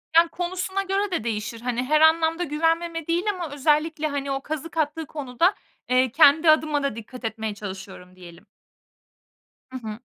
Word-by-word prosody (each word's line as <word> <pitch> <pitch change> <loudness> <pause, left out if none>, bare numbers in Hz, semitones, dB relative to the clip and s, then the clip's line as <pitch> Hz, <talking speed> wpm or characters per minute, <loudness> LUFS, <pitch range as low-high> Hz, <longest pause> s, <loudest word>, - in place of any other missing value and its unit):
Yani, 335 0 +6
konusuna 365 +2 -3
göre 390 +1 -1
de 335 - -1
değişir. 225 0 -4
Hani, 245 0 -1
her 305 +4 +2
anlamda 320 +1 +4
güvenmeme 330 +1 -1
değil 340 +2 +1
ama 345 -5 -6
özellikle, 305 +2 +1
hani, 280 -1 -3
o 270 0 -2
kazık 310 +3 -6
attığı 315 +1 -1
konuda, 290 - 0 0.3
eee, 255 -1 +3
kendi 310 +2 +6
adıma 305 -2 +3
da 280 -6 -1
dikkat 235 +2 -9
etmeye 220 -1 -3
çalışıyorum 190 -2 -9
diyelim. 175 +1 -14 1.3
Hı 260 - -5
hı. 215 +1 -6
300 Hz, 160 wpm, -24 LUFS, 245-330 Hz, 1.3 s, Yani